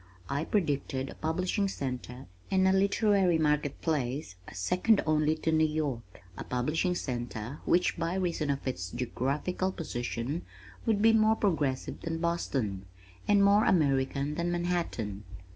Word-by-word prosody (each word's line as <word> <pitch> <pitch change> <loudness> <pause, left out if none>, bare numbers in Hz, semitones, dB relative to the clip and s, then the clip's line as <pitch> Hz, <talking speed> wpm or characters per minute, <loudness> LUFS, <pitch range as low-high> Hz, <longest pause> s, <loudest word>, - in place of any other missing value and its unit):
I 145 +3 -1
predicted 140 -8 -1
a - - -8
publishing 185 +5 -1
center 125 -6 -5 0.2
and 190 -1 +3
a 190 - +4
literary 195 -2 +3
market 150 -2 +1
place 140 - -2 0.2
second 180 - +2
only 155 0 +2
to 160 +1 -1
New 160 0 +3
York, 140 -11 -4
a - - -6
publishing 155 +8 0
center 120 -3 -4
which 180 -1 +2
by 165 +2 -1
reason 170 -5 -1
of 140 -1 -1
its 90 -8 -3
geographical 140 - -2
position 125 -1 -3 0.5
would 215 -2 +2
be 225 0 +6
more 220 0 +4
progressive 150 -11 -1
than 165 -1 -3
Boston, 130 - -2 0.4
and 205 -1 +5
more 205 +2 +5
American 140 -3 +2
than 170 +2 -1
Manhattan. 170 - -2
155 Hz, 140 wpm, -30 LUFS, 130-180 Hz, 0.5 s, be